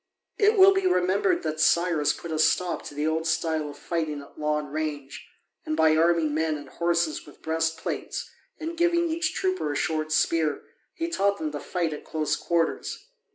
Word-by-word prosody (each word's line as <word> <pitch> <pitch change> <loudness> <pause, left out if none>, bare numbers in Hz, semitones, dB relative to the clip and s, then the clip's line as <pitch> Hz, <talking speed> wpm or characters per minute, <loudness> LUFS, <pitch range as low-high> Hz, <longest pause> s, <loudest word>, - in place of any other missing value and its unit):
It 425 0 +4
will 385 0 +8
be 385 -1 +1
remembered 200 - +2
that 155 0 -3
Cyrus 160 -2 +3
put 170 - -7
a 155 - -1
stop 175 +2 +2
to 145 - -8
the 150 +1 -1
old 160 +1 0
style 160 -2 0
of 145 - -10
fighting 155 -3 -2
at 140 - -16
long 150 -1 -1
range, 150 -3 -4 0.4
and 155 - -3
by 160 -1 +5
arming 165 -1 +3
men 155 0 0
and 145 -2 -11
horses 170 -1 0
with 145 - -16
breastplates 160 0 -2 0.3
and 330 +1 -4
giving 340 0 +2
each 320 0 -1
trooper 370 - -1
a - - -3
short 155 -1 -1
spear 155 0 +1 0.3
he 330 -2 -2
taught 200 - +1
them 155 -4 -3
to 145 - -5
fight 170 -2 -2
at 150 - -8
close 155 -1 -1
quarters. 170 - -2
160 Hz, 185 wpm, -26 LUFS, 155-190 Hz, 0.4 s, will